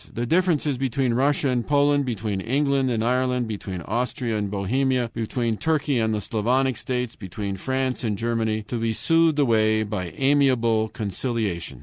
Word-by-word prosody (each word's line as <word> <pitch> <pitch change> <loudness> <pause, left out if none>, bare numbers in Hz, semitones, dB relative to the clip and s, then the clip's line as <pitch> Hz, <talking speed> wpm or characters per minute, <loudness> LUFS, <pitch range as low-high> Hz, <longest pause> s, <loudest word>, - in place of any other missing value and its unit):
The 120 - -3
differences 155 -3 +1
between 130 -1 0
Russia 140 +3 +2
and 125 -2 0
Poland, 145 0 +2
between 105 -5 -3
England 135 +3 +1
and 115 -2 0
Ireland, 125 0 +1
between 95 -4 -5
Austria 120 - -2
and 105 -1 -1
Bohemia, 120 +5 0
between 115 0 -2
Turkey 150 -3 0
and 110 -1 +1
the 105 -1 -1
Slavonic 125 +5 0
states, 125 -2 -3
between 100 0 -5
France 130 +5 -2
and 105 -3 -1
Germany, 110 -1 -1
to 120 +3 -4
be 115 0 0
soothed 165 +4 +2
away 110 -5 +3
by 95 -5 -4
amiable 130 -6 +3
conciliation! 105 - -3
120 Hz, 155 wpm, -24 LUFS, 110-135 Hz, -, away